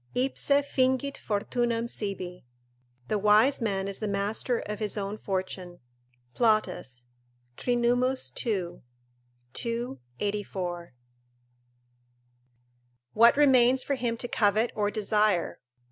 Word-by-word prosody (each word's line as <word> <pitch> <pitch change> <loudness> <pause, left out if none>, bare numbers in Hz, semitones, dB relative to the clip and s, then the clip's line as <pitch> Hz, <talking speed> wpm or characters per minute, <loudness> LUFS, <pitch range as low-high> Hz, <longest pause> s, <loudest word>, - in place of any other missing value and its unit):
ipse 260 +3 +1
fingit 280 -1 +2
fortunam 230 +2 -1
sibi;" 185 -5 -4 0.6
["The 210 - 0
wise 215 +7 +4
man 195 -3 -1
is 200 - -5
the 215 - -2
master 205 +4 -1
of 210 0 -5
his 215 -1 -2
own 205 +1 -3
fortune," 185 -2 -4 0.5
Plautus, 215 - 0 0.5
Trin., 240 - 0
ii. 240 -7 -1 0.7
2, 235 - -3 0.2
84.] 185 -6 -3 2.2
what 235 +4 +6
remains 260 -3 +5
for 280 - -1
him 240 -3 -1
to 245 - -4
covet 215 +1 +2
or 205 -1 0
desire? 210 -3 +1
215 Hz, 100 wpm, -28 LUFS, 200-245 Hz, 2.2 s, what